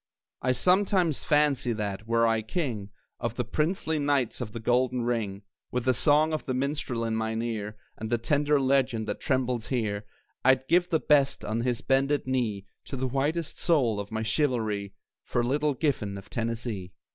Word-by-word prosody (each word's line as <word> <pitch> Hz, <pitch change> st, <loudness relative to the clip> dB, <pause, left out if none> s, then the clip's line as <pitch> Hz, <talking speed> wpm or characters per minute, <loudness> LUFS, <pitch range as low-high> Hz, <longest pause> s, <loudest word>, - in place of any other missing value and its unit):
I 130 Hz, -, +2 dB
sometimes 180 Hz, +2 st, +2 dB
fancy 145 Hz, -5 st, +2 dB
that, 105 Hz, -1 st, -4 dB
were 115 Hz, 0 st, +3 dB
I 115 Hz, -1 st, +2 dB
king 110 Hz, -, -3 dB, 0.3 s
Of 115 Hz, -1 st, -3 dB
the 125 Hz, -, -2 dB
princely 155 Hz, +4 st, 0 dB
knights 140 Hz, -5 st, 0 dB
of 110 Hz, -4 st, -4 dB
the 115 Hz, -, -6 dB
Golden 125 Hz, +2 st, +1 dB
Ring, 110 Hz, -5 st, -2 dB, 0.3 s
With 125 Hz, 0 st, -2 dB
the 130 Hz, -, +4 dB
song 150 Hz, +5 st, +3 dB
of 155 Hz, -, -3 dB
the 130 Hz, -, 0 dB
minstrel 135 Hz, -3 st, -1 dB
in 115 Hz, -1 st, -1 dB
mine 110 Hz, +1 st, -1 dB
ear, 105 Hz, -2 st, -4 dB, 0.2 s
And 110 Hz, -, -4 dB
the 120 Hz, -, +2 dB
tender 145 Hz, +4 st, +2 dB
legend 130 Hz, -4 st, +1 dB
that 105 Hz, -, -3 dB
trembles 125 Hz, -4 st, 0 dB
here, 105 Hz, -5 st, -1 dB, 0.4 s
I'd 130 Hz, 0 st, +4 dB
give 175 Hz, +1 st, +3 dB
the 160 Hz, -, +2 dB
best, 140 Hz, -3 st, +2 dB
on 110 Hz, +2 st, -1 dB
his 120 Hz, -1 st, -1 dB
bended 135 Hz, +2 st, +1 dB
knee, 115 Hz, -7 st, -1 dB, 0.2 s
The 130 Hz, -1 st, -2 dB
whitest 145 Hz, +5 st, -1 dB
soul 125 Hz, -, +2 dB
of 100 Hz, +1 st, -6 dB
my 110 Hz, 0 st, -2 dB
chivalry, 110 Hz, -6 st, 0 dB, 0.3 s
For 120 Hz, -, 0 dB
Little 145 Hz, +3 st, +1 dB
Giffen 115 Hz, -10 st, -1 dB
of 100 Hz, -, -12 dB
Tennessee. 115 Hz, -5 st, -3 dB
125 Hz, 175 wpm, -28 LUFS, 110-145 Hz, 0.4 s, the